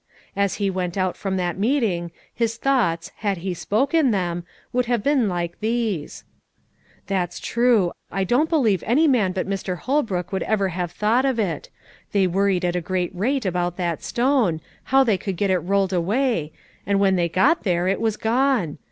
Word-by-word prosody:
As 200 -1 +1
he 200 -2 0
went 180 -1 -3
out 185 -1 0
from 190 -1 -3
that 180 0 -2
meeting, 205 -8 0 0.2
his 230 -1 -1
thoughts, 215 -12 0
had 200 -3 -1
he 185 - -1
spoken 270 - +1
them, 175 -5 -1 0.3
would 250 -1 +1
have 240 -3 0
been 270 -6 +2
like 175 -1 -3
these: 220 -7 -2 0.8
"That's 180 -3 -2
true, 235 -7 +2 0.2
I 195 +1 0
don't 250 - +2
believe 225 - +2
any 290 +8 +4
man 225 -9 +3
but 185 0 -3
Mr. 190 -2 -3
Holbrook 220 - -1
would 190 - -1
ever 200 -3 +1
have 175 -1 -3
thought 220 +7 +1
of 265 -3 +1
it: 180 -9 -2 0.4
they 200 -2 +3
worried 190 0 +1
at 175 0 0
a 180 - 0
great 180 +1 -2
rate 245 +7 -1
about 175 -1 -1
that 170 -3 -2
stone, 240 - +1 0.3
how 270 +1 +4
they 215 -7 +1
would 195 -3 -3
get 200 0 +1
it 185 - +3
rolled 195 +1 0
away, 185 - 0 0.4
and 200 -1 +2
when 195 -1 +3
they 170 -1 +1
got 190 - +3
there 180 -2 0
it 195 +3 0
was 220 -2 0
gone. 235 - +1
195 Hz, 185 wpm, -23 LUFS, 180-235 Hz, 0.8 s, any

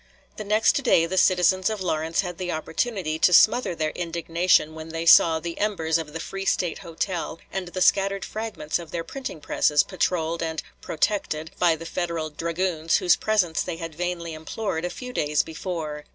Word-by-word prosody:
The 215 - -4
next 215 +6 +2
day 175 -10 +4
the 175 +3 -3
citizens 185 +1 +3
of 215 -1 -3
Lawrence 165 -3 0
had 180 -2 -6
the 180 -1 -2
opportunity 160 0 -2
to 180 - +5
smother 215 +2 +5
their 155 -1 -1
indignation 170 -1 +1
when 160 0 -8
they 165 +1 -4
saw 165 -1 +7
the 170 +1 -6
embers 165 -6 0
of 155 -2 -6
the 165 - -5
Free 195 +3 -5
State 180 -3 0
Hotel 165 0 -4
and 190 -1 -3
the 180 +1 -1
scattered 195 0 +2
fragments 215 -8 -3
of 170 -2 -9
their 165 +2 -3
printing 255 - -7
presses 150 0 +2
patrolled 170 -3 -1
and 160 -2 -3 0.2
"protected" 160 -2 -1
by 170 -2 +4
the 165 +1 -9
Federal 165 -2 -3
dragoons 165 +1 0
whose 180 - +4
presence 190 -7 +1
they 175 -2 -4
had 165 -1 -6
vainly 170 0 -3
implored 160 +2 -4
a - - -1
few 250 +6 -8
days 150 -7 +1
before. 160 -3 -5
170 Hz, 180 wpm, -24 LUFS, 160-185 Hz, 0.2 s, saw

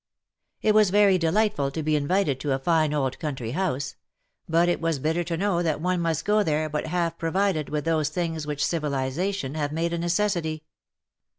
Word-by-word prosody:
It 215 - +4
was 215 -2 +5
very 200 -1 +4
delightful 165 -4 +1
to 155 +3 -4
be 155 0 +1
invited 150 -1 +1
to 140 0 -1
a - - +1
fine 155 +2 +2
old 135 -3 -1
country 135 -8 -4
house; 145 -4 -2 0.5
but 165 +2 +3
it 175 - 0
was 165 -2 0
bitter 160 +5 0
to 165 0 -2
know 185 -2 +1
that 160 -4 0
one 180 +1 0
must 165 -1 -1
go 210 +1 +3
there 155 -4 0
but 150 0 -3
half 170 -2 -1
provided 165 -2 0
with 150 -1 -2
those 155 -2 +1
things 160 -2 -3
which 145 -1 -1
civilization 150 +1 -2
have 150 -2 -2
made 165 +2 -1
a 170 - -1
necessity. 175 -3 0
165 Hz, 190 wpm, -25 LUFS, 150-180 Hz, 0.5 s, was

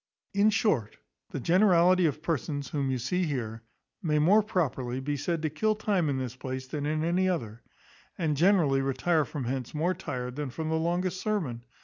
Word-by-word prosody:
In 200 +2 +4
short, 180 - +1 0.3
the - - -4
generality 180 - +4
of 150 +1 -3
persons 145 -4 -2
whom 140 -2 -1
you 130 - 0
see 180 +10 0
here 115 -7 -3 0.4
may 155 -5 +1
more 185 +9 +5
properly 135 - -1
be 145 +2 -2
said 160 +3 -2
to 155 - +1
kill 215 +8 +1
time 200 -7 0
in 135 - 0
this 130 -2 -4
place 130 0 -5
than 145 +2 -4
in 155 +1 0
any 180 +3 +2
other; 115 - -3 0.6
and 155 -4 0
generally 160 -5 +4
retire 140 +4 +1
from 140 +1 -5
hence 130 +2 -3
more 170 +5 +1
tired 125 -7 -5
than 145 -2 -3
from 155 +5 -4
the 160 - +1
longest 175 +3 -1
sermon. 160 - -2
155 Hz, 190 wpm, -28 LUFS, 130-180 Hz, 0.6 s, more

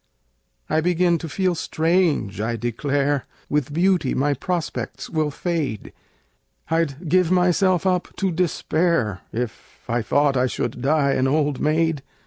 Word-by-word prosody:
I 160 - +1
begin 175 0 +2
to 165 - -6
feel 185 +3 +1
strange, 160 - 0
I 115 +2 -1
declare! 135 +4 -1 0.2
With 145 -1 0
beauty 175 -3 +2
my 145 +2 +2
prospects 170 +5 -4
will 155 -2 0
fade 150 - -3 0.8
I'd 165 0 -1
give 180 +1 +3
myself 180 0 +3
up 180 -2 +1
to 195 -2 0
despair 165 - 0
If 120 0 -6
I 120 0 0
thought 145 +4 +2
I 130 0 +2
should 120 0 -3
die 140 +1 +2
an 130 -1 +1
old 145 0 +1
maid! 155 -1 +1
155 Hz, 135 wpm, -22 LUFS, 135-175 Hz, 0.8 s, give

